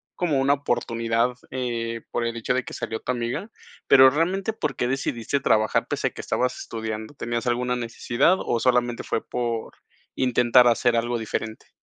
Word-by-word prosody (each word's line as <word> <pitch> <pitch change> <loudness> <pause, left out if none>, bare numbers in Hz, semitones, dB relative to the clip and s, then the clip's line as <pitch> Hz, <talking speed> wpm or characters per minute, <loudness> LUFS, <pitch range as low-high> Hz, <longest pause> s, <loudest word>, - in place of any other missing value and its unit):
como 155 -6 0
una 140 +1 +4
oportunidad, 120 -3 0 0.2
eh, 115 -3 -3
por 120 - -1
el 115 0 -2
hecho 115 +2 -1
de 130 - 0
que - - -8
salió 110 -2 -4
tu 125 - -3
amiga. 125 - -3 0.4
Pero 130 0 +8
realmente, 180 +8 0
¿por 150 - -3
qué 120 - -1
decidiste 135 0 -1
trabajar 110 -5 +2
pese - - -1
a - - 0
que - - -8
estabas 125 0 -1
estudiando? 110 +1 -5
¿Tenías 120 -3 -3
alguna 125 +1 0
necesidad 120 +7 +1
o 120 - -1
solamente 120 -1 +1
fue 115 - -2
por 120 -2 -3 0.4
intentar 125 -1 +4
hacer 120 0 +3
algo 120 +1 0
diferente? 110 0 -5
120 Hz, 170 wpm, -24 LUFS, 115-130 Hz, 0.4 s, Pero